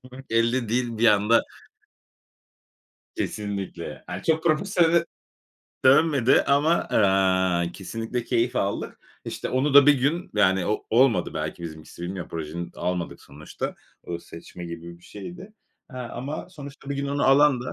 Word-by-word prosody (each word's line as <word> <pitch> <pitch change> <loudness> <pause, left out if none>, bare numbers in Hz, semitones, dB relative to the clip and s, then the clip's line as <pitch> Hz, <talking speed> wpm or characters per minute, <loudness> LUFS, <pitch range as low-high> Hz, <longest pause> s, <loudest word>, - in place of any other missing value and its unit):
Gülmemek 130 +1 -13
elde 115 +1 +1
değil 120 0 -1
bir 115 - +4
anda 105 +1 +4 1.8
Kesinlikle. 100 -3 -4
Ha, 90 +2 -6
çok 160 0 +1
profesyonele 170 0 +3 0.8
dönmedi 140 -2 +5
ama, 145 +3 +3
aaa, 95 - +2
kesinlikle 115 +4 -4
keyif 120 +1 0
aldık. 100 0 -2 0.3
İşte, - - -5
onu 135 +3 0
da 145 -1 +9
bir 145 - +7
gün 145 +7 -1
yani 95 -3 +3
o 105 - -2
olmadı 115 -6 +3
belki 80 +2 -4
bizimkisi, 80 0 -9
bilmiyorum. 90 0 -5
Projeni 85 +2 -5
almadık 90 -1 -3
sonuçta. 75 +2 -7 0.3
O 85 -1 -5
seçme 85 +1 -11
gibi 85 0 -8
bir - - -26
şeydi. 180 - -10 0.4
He 130 - -10
ama 125 +6 -6
sonuçta 145 -5 -11
bir 140 - -2
gün 140 0 -2
onu 140 0 0
alan 135 -1 +5
da 125 - -5
115 Hz, 140 wpm, -25 LUFS, 90-140 Hz, 1.8 s, da